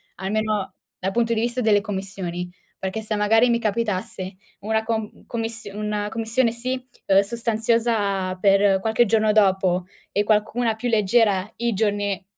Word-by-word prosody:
almeno 210 +1 -2 0.2
dal 190 +1 -2
punto 230 +1 +1
di 220 - 0
vista 240 +1 -1
delle 210 -2 +4
commissioni. 190 -3 -4 0.3
Perché 190 +4 -3
se 215 0 -2
magari 225 +4 +4
mi 235 0 +2
capitasse 215 -3 -2 0.2
una 220 +2 0
com 220 -1 -4
commissio 225 -3 -4
una 210 -1 -2
commissione, 230 +2 +1
sì, 250 +2 -3 0.3
uhm, 195 0 +6
sostanziosa 220 -3 0
per 195 0 +4
qualche 220 +3 +2
giorno 215 0 +3
dopo 190 -3 +2 0.3
e 205 - +1
qualcuna 220 +2 +1
più 245 +2 -4
leggera 210 -2 +2
i 235 -1 0
giorni 205 -2 -1
215 Hz, 145 wpm, -23 LUFS, 195-225 Hz, 0.3 s, uhm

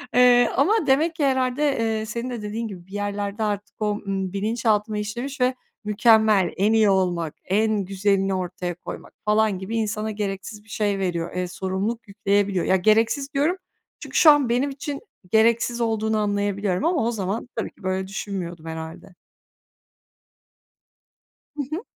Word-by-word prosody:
Eee, 245 -1 +6
ama 355 +4 +2
demek 310 +5 +3
ki 305 -4 +1
herhâlde, 260 +1 +1 0.2
eee, 220 -1 0
senin 235 +3 -4
de 240 -3 -5
dediğin 215 +2 -4
gibi 185 -4 -10
bir - - -20
yerlerde 205 +1 -2
artık 205 -1 -3
o, 210 - +1 0.2
ııı, 190 -1 -2
bilinçaltıma 215 0 0
işlemiş 240 +6 -4
ve 255 +1 +3 0.3
mükemmel, 215 -2 +4
en 205 +3 +3
iyi 220 -2 +5
olmak, 175 -5 0
en 210 +1 +1
güzelini 195 0 +1
ortaya 180 -1 -3
koymak 175 - -9
falan 210 -2 +2
gibi 195 +4 -5
insana 215 0 -1
gereksiz 205 0 -5
bir 220 - -23
şey 205 -2 0
veriyor, 175 -3 -2
eee, 180 0 -1
sorumluluk 195 +6 -3
yükleyebiliyor. 200 -2 0
Ya, 190 - +3
gereksiz 225 - +2
diyorum 300 +7 +1 0.4
çünkü - - -4
şu 315 - +9
an 290 -4 +3
benim 250 +4 +1
için 280 +1 -5 0.3
gereksiz 235 +2 +3
olduğunu 220 -1 0
anlayabiliyorum 205 -2 0
ama 335 -5 +2
o 235 - +1
zaman 210 +2 -3
tabii 225 - -3
ki - - -22
böyle 185 0 -1
düşünmüyordum 185 -4 -5
herhâlde. 160 +3 -8 2.4
Hı 290 - -2
hı. 350 - -4
210 Hz, 155 wpm, -23 LUFS, 195-235 Hz, 2.4 s, şu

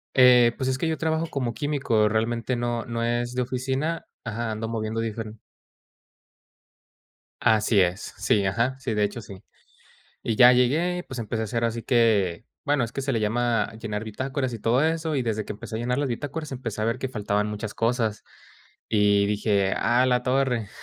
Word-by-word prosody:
Eh, 125 -2 +7
pues 130 -1 -1
es 130 - 0
que 165 - -1
yo 160 - -1
trabajo 160 0 0
como 125 -6 -2
químico. 140 -8 +1
Realmente 115 +3 0
no 120 -1 -2
no 115 0 -3
es 120 +1 -1
de 125 - 0
oficina 130 +6 -2 0.2
ajá, 115 0 -3
ando 110 +1 -3
moviendo 110 0 -3
diferen 110 -1 -5 2.0
Así 110 -2 +4
es. 90 +1 -1
Sí, 100 -2 +2
ajá. 115 +7 0
Sí, 130 -3 -3
de 105 -1 +1
hecho, 105 +3 -2
sí. 100 -3 -11 0.8
Y 115 - -1
ya 125 +1 +8
llegué 155 +9 +2
y - - -4
pues 130 - -8
empecé 110 0 -2
a - - -1
hacer 115 +1 -2
así 115 0 -1
que 110 -6 +2 0.2
bueno, 145 -4 +2
es 115 - -7
que 135 - -4
se 135 - -2
le 115 - +1
llama 115 +1 0
llenar 105 -1 -4
bitácoras 130 +4 -3
y 110 - -7
todo 120 +4 +2
eso. 160 -2 0
Y 130 - +1
desde 110 -3 -2
que - - -5
empecé 110 +2 -7
a - - -3
llenar 125 +2 -1
las 145 - 0
bitácoras, 145 +4 -4
empecé 115 -5 -5
a - - +1
ver 115 0 0
que 130 - -3
faltaban 105 -3 -1
muchas 105 0 -5
cosas 115 -2 0 0.7
y 100 -2 +3
dije: 100 -2 +1
"A 125 +2 +3
la 125 -1 +2
torre". 125 -4 0
120 Hz, 195 wpm, -25 LUFS, 110-130 Hz, 2.0 s, ya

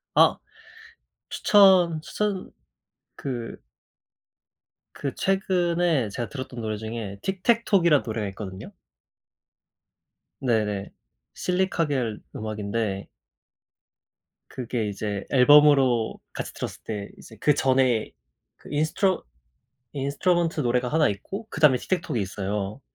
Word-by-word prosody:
아. - - +5 0.9
추천, 185 -6 +5
추천 200 +2 -3 0.6
그 120 -4 -5 1.4
그 140 - -4
최근에 175 - +1
제가 120 +3 -4
들었던 130 -3 -6
노래 110 -1 -3
중에 110 -2 -6
Tic-tac-toe이란 190 - +2
노래가 110 -2 -3
있거든요. 95 -1 -8 1.7
네네. 105 -5 0 0.4
실리카겔 165 - -1
음악인데 105 -2 -3 1.4
그게 120 -3 -3
이제 100 0 -4
앨범으로 135 -3 +5
같이 - - -5
들었을 - - -6
때 105 -2 -5
이제 110 - -14
그 150 - +4
전에 130 -4 +2 0.5
그 - - -16
인스트루 155 +6 +1 0.7
인스트루먼트 160 +4 0
노래가 125 -1 +1
하나 155 +2 +3
있고 195 - -5
그다음에 150 -4 +4
틱택톡이 155 - -2
있어요. 100 +3 -3
130 Hz, 250 characters per minute, -25 LUFS, 110-170 Hz, 1.7 s, 아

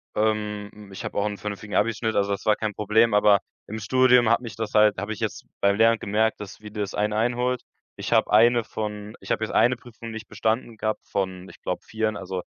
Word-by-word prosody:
Ähm, 105 -1 -1
hm, 105 -2 -13
ich 95 +5 -8
habe 110 - -5
auch 100 - +1
'n 105 -1 -3
vernünftigen 105 0 -6
Abi-Schnitt. 110 0 +1
Also, 100 0 +1
das 100 - -3
war 105 -1 +4
kein 110 -1 -3
Problem. 110 +2 +3
Aber 105 -1 +5 0.3
im 110 +1 -5
Studium 125 +2 +4
hat 115 - +3
mich 115 -5 -8
das 110 -1 -4
halt 105 -1 +5
habe 105 +3 -3
ich 105 - -10
jetzt - - -4 0.2
beim 100 0 +3
Lernen 115 0 +4
gemerkt, 110 +2 0
dass 100 0 -9
wie 105 -1 -10
das 105 -2 -4
einen 105 0 0
einholt. 120 +3 0 0.3
Ich - - -3
habe - - +3
eine 120 +2 +5
von 105 -1 -6
ich - - -7
habe - - 0
jetzt - - -3
eine 120 +2 +4
Prüfung 115 -1 -11
nicht 110 0 -8
bestanden 115 0 -2
gehabt 110 0 -2
von 95 -1 -3
ich - - -16
glaube - - -3
vieren. 110 -1 -2
Also, 95 -1 -5
105 Hz, 230 wpm, -25 LUFS, 105-115 Hz, 0.3 s, Aber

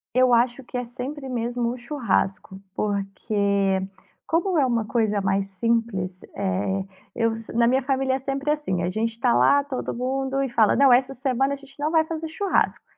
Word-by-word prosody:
Eu 255 -1 +5
acho 240 +2 +2
que 250 0 -6
é 245 - -1
sempre 260 +4 -6
mesmo 240 -1 -1
o 250 - -6
churrasco. 230 -7 -2 0.2
Porque 200 -1 0 0.4
como 345 +2 +1
é 280 - +4
uma 235 -3 0
coisa 210 -2 0
mais 195 0 0
simples, 195 -3 -1
eh, 195 0 -1 0.3
eu 230 -1 +1
se 225 0 -9
na 235 0 +3
minha 260 +3 +3
família 265 0 +1
é - - -2
sempre 275 +2 -2
assim, 275 - -1
a 175 - 0
gente 220 +4 -1
está 225 - +1
lá 125 - +4
todo 275 -2 -4
mundo 265 +2 -1
e 265 - -2
fala: 225 -3 +3
"Não, 275 -1 +5
essa 255 +2 +4
semana 270 +1 0
a - - -1
gente 275 0 -17
não 300 +2 0
vai 320 -1 +4
fazer 320 0 -4
churrasco", 385 +5 0
240 Hz, 190 wpm, -24 LUFS, 205-270 Hz, 0.4 s, Eu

